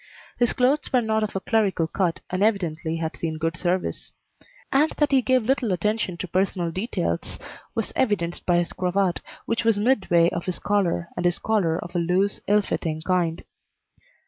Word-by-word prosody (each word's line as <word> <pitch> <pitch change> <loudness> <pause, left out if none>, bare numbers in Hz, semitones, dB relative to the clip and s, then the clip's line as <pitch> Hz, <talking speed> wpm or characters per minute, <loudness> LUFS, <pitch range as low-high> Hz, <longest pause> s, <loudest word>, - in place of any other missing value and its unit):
His 240 - +3
clothes 265 +4 +1
were 255 - +4
not 220 -1 0
of 215 -2 -3
a - - +1
clerical 200 -5 +1
cut, 170 +1 -1
and 185 +1 -1
evidently 170 -7 0
had 160 -1 -3
seen 160 -1 -3
good 165 +1 -1
service; 180 +2 -2 0.6
and 295 +4 +4
that 295 -1 +2
he 270 -1 +5
gave 255 -1 +2
little 250 -3 +1
attention 190 0 -1
to 185 - -5
personal 180 -1 0
details 195 +8 -3 0.4
was - - -2
evidenced 195 -9 0
by 175 -1 +4
his 175 -1 -1
cravat, 185 0 0 0.2
which 230 0 -1
was 225 -2 +3
midway 190 -7 +3
of 170 - -4
his 180 - -1
collar, 180 -4 0
and 175 - -3
his 175 -1 +2
collar 190 -7 +1
of 175 +1 -8
a - - +2
loose, 185 +4 +1
ill 205 +1 +4
fitting 160 -4 -3
kind. 175 -2 0
185 Hz, 180 wpm, -24 LUFS, 170-220 Hz, 0.6 s, he